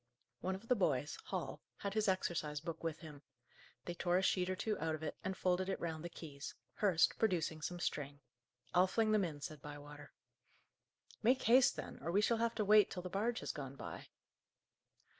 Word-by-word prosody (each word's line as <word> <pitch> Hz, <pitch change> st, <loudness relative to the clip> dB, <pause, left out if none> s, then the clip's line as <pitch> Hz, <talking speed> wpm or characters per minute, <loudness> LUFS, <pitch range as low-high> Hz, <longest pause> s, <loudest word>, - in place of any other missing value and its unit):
One 190 Hz, +1 st, -1 dB
of 205 Hz, +4 st, -10 dB
the 250 Hz, -, +4 dB
boys, 150 Hz, -, +1 dB
Hall, -, -, -4 dB, 0.2 s
had 200 Hz, -1 st, -3 dB
his 215 Hz, 0 st, +1 dB
exercise 170 Hz, -5 st, 0 dB
book 160 Hz, +2 st, -6 dB
with 165 Hz, -1 st, -2 dB
him. 150 Hz, -4 st, -10 dB, 0.6 s
They 175 Hz, -, -3 dB
tore 175 Hz, +1 st, +1 dB
a 190 Hz, -, +2 dB
sheet 185 Hz, -1 st, +2 dB
or 185 Hz, -, 0 dB
two 215 Hz, +3 st, -1 dB
out 160 Hz, 0 st, 0 dB
of 155 Hz, -, -8 dB
it, 155 Hz, -, -3 dB
and 190 Hz, 0 st, -2 dB
folded 185 Hz, +1 st, +1 dB
it 190 Hz, -, -1 dB
round 160 Hz, -2 st, -3 dB
the 175 Hz, -, -4 dB
keys, 150 Hz, -4 st, -8 dB, 0.2 s
Hurst 185 Hz, -5 st, +3 dB
producing 165 Hz, -7 st, +1 dB
some 175 Hz, +3 st, -3 dB
string. 145 Hz, -4 st, -2 dB, 0.5 s
"I'll 180 Hz, +1 st, +6 dB
fling 220 Hz, +3 st, +2 dB
them 215 Hz, -2 st, +4 dB
in," 150 Hz, -5 st, -4 dB
said 150 Hz, 0 st, -6 dB
Bywater. 145 Hz, 0 st, -9 dB, 1.1 s
"Make 255 Hz, +4 st, +4 dB
haste, 250 Hz, +2 st, +6 dB
then, -, -, -6 dB
or 160 Hz, -, -3 dB
we 195 Hz, -, +4 dB
shall 230 Hz, +2 st, +3 dB
have 230 Hz, 0 st, 0 dB
to 210 Hz, -, 0 dB
wait 210 Hz, +1 st, +7 dB
till 180 Hz, -, -5 dB
the 180 Hz, -, -4 dB
barge 225 Hz, +5 st, 0 dB
has -, -, -2 dB
gone 140 Hz, -3 st, -6 dB
by." -, -, -7 dB
175 Hz, 200 wpm, -37 LUFS, 155-200 Hz, 1.1 s, wait